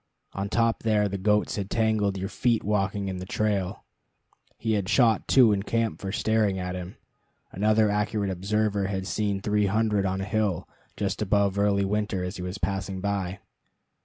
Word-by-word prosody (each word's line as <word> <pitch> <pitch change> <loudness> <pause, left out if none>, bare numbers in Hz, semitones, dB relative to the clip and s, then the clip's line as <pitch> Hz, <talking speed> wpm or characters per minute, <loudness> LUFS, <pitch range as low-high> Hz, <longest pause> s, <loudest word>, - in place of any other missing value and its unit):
On 100 +1 -3
top 115 +1 +1
there 105 -2 +2
the 100 0 -4
goats 105 +2 +1
had 100 -1 -3
tangled 110 -3 +1
your 95 +1 -3
feet 115 +3 0
walking 100 -1 0
in 95 -1 -3
the 90 - -6
trail. 100 -2 -1 0.7
He 110 -1 -1
had 100 -2 -1
shot 115 -1 +3
two 125 -5 +6
in 100 - 0
camp 115 +2 -1
for 95 - -3
staring 110 -2 +1
at 90 -1 -3
him. 90 0 -7 0.5
Another 110 +2 +3
accurate 105 -1 0
observer 100 +2 0
had 95 -1 -3
seen 100 -1 -1
three 105 0 +1
hundred 105 -1 +1
on 95 +1 -2
a 95 - -2
hill 100 -3 -1 0.3
just 100 0 -2
above 100 -1 +2
Early 100 -1 +2
Winter 105 -2 -1
as 90 +3 -4
he - - -6
was 90 +2 -4
passing 95 0 -3
by. 95 -1 -2
100 Hz, 180 wpm, -26 LUFS, 95-105 Hz, 0.7 s, two